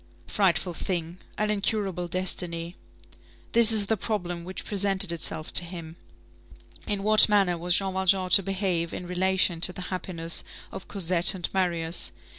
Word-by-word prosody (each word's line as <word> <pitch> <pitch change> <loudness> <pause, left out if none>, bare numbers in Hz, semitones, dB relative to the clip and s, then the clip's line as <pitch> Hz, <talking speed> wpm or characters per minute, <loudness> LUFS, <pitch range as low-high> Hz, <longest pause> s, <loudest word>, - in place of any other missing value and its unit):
Frightful 180 - 0
thing! 170 0 -5 0.2
an 210 0 -1
incurable 200 -4 -2
destiny! 175 -1 -4 0.8
This 230 -1 +6
is 215 -2 +3
the 220 - 0
problem 180 -5 -5
which 185 +2 -8
presented 195 -3 0
itself 160 -1 -4
to - - +5
him: 170 -2 -9 0.9
In 205 -2 -2
what 215 +1 +8
manner 195 -4 +2
was 175 +1 +2
Jean 195 -1 -1
Valjean 190 -1 0
to 200 - +7
behave 185 -3 -3
in 180 - -7
relation 180 -1 0
to 180 - +7
the 180 +1 -8
happiness 170 -2 -3 0.3
of - - -9
Cosette 180 -1 +3
and 175 -3 -2
Marius? 170 -3 -1
185 Hz, 150 wpm, -25 LUFS, 170-195 Hz, 0.9 s, what